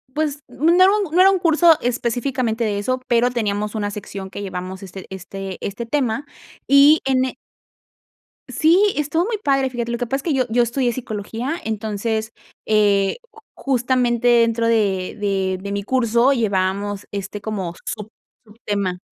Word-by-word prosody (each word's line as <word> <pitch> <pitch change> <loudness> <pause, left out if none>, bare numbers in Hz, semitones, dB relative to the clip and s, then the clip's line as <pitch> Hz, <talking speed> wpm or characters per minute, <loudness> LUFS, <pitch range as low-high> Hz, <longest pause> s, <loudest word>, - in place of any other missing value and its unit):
pues, 300 -2 -1
no 330 +4 +2
era 370 +1 +6 0.2
no 355 - +2
era 385 - +7
un 380 - +1
curso 330 -1 +5
específicamente 245 -1 -1
de 205 -2 -1
eso, 255 +5 -1
pero 240 +1 +3
teníamos 210 -2 -2
una 205 -1 -2
sección 200 -2 -7
que 200 - -7
llevamos 185 -1 -6
este 190 0 -9
este 190 0 -7
este 205 +4 -4
tema 260 +1 -1 0.4
y 285 +3 +6
en 260 -1 +2
e 260 - -5 1.1
Sí, 370 +6 +3
estuvo 300 +4 0
muy 445 0 -2
padre, 275 -8 +1
fíjate, 235 -1 -3
lo 235 - -2
que 245 - -2
pasa 270 - -1
es 275 - -6
que 315 -5 0
yo 255 -1 +2
yo 240 +2 +2
estudié 240 +1 0
psicología, 230 +3 -4
entonces, 220 +1 -2 0.3
eh, 205 -2 +3 0.2
ju 445 - -16
justamente 245 -2 0
dentro 230 -1 +3
de 200 -5 +1
de 190 -2 -1
de 200 +1 -5
mi 200 0 -3
curso 240 +2 +2
llevábamos, 200 -3 -1
este, 200 +1 -5
como 195 -5 -4
sub 210 +1 -5 0.3
subtema. 205 -4 -3
230 Hz, 165 wpm, -21 LUFS, 200-265 Hz, 1.1 s, era